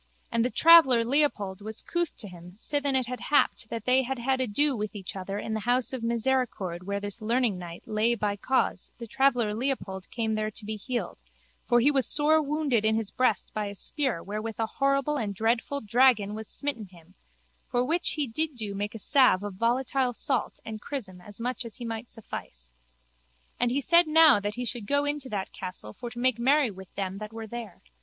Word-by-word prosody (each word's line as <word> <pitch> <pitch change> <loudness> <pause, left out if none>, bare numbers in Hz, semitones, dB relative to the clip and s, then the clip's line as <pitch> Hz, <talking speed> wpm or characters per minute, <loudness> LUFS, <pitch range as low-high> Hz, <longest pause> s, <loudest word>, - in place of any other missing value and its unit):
And 230 0 +2
the 245 - +1
traveller 265 -7 +7
Leopold 230 -8 0
was 220 +1 -5
couth 345 -2 -1
to 215 - -4
him 180 -1 -12
sithen 285 +4 -1
it 255 - -2
had 250 +1 -5
happed 285 -5 +2
that 230 -2 -5
they 255 +1 +4
had 265 +1 -3
had 260 +2 0
ado 260 +1 +1
each 205 -3 -5
with - - -18
other 195 +1 -4
in 220 +1 -4
the 220 - -1
house 245 +4 +1
of 260 - -3
misericord 230 -7 -1
where 200 +1 -2
this 205 +2 -3
learningknight 215 -7 -1
lay 220 +3 +1
by 210 -3 -1
cause 260 +6 0
the 235 - -7
traveller 245 -3 +2
Leopold 215 -6 -3
came 225 -2 -1
there 215 0 -1
to 215 0 -7
be 215 +1 -3
healed 220 - -4 0.5
for 240 - +5
he 285 +5 +4
was 270 -5 +1
sore 310 +1 +3
wounded 290 -6 0
in 220 0 +3
his 220 -2 -2
breast 250 -6 +1
by 210 -1 -2
a 200 - -7
spear 260 - -2
wherewith 215 +2 -5
a 225 - +2
horrible 275 +4 0
and 205 -6 -3
dreadful 230 +6 0
dragon 225 -2 +3
was 220 0 -6
smitten 265 -8 -4
him 175 -1 -19 0.5
for 245 0 0
which 335 +5 0
he 300 -2 -1
did 300 +5 -2
do 215 -4 -5
make 205 +2 -4
a - - -3
salve 225 -3 +4
of 205 -1 -4
volatile 250 +4 +1
salt - - -1
and 220 -1 -6
chrism 200 -11 -6
as 205 +3 -7
much 250 +1 -2
as 230 -2 -9
he 240 - -7
might 230 +1 -5
suffice. 60 - -9 0.9
And 245 - +2
he 270 +4 0
said 340 +4 +5
now 310 -6 +7
that 205 +1 -3
he 245 0 -3
should 235 -3 -4
go 285 +3 +2
in 290 +1 0
to 265 -2 -7
that 195 -4 -3
castle 145 - -6
for 240 - -7
to 240 - -11
make 245 -1 +1
merry 265 0 +3
with 190 -1 -12
them 195 0 -3
that 215 0 -7
were 225 0 -7
there. 225 -3 -8
230 Hz, 210 wpm, -27 LUFS, 205-265 Hz, 0.9 s, traveller